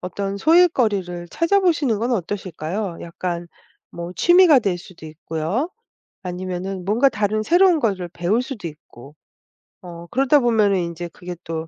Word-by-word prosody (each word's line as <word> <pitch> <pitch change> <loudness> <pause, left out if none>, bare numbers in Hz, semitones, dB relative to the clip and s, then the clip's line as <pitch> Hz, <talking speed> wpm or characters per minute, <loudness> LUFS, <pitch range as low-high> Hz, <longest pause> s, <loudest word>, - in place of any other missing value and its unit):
어떤 195 +2 -4
소일거리를 210 - +2
찾아보시는 335 - +1
건 235 +4 -1
어떠실까요? 185 -2 -4
약간 170 0 -5 0.4
뭐 170 +1 -7
취미가 345 - +6
될 195 -5 -1
수도 175 -2 -13
있고요. 165 - -3 0.5
아니면은 185 +1 -5
뭔가 225 +8 +3
다른 215 -1 -1
새로운 350 - +4
거를 190 -7 -1
배울 180 +8 0
수도 250 -8 -6
있고. 150 -3 -14 0.7
어 170 -1 -10
그러다 270 +3 +3
보면은 220 -6 +2
인제 170 0 -4
그게 180 0 -8
또 160 -1 -5
195 Hz, 315 characters per minute, -21 LUFS, 175-245 Hz, 0.7 s, 취미가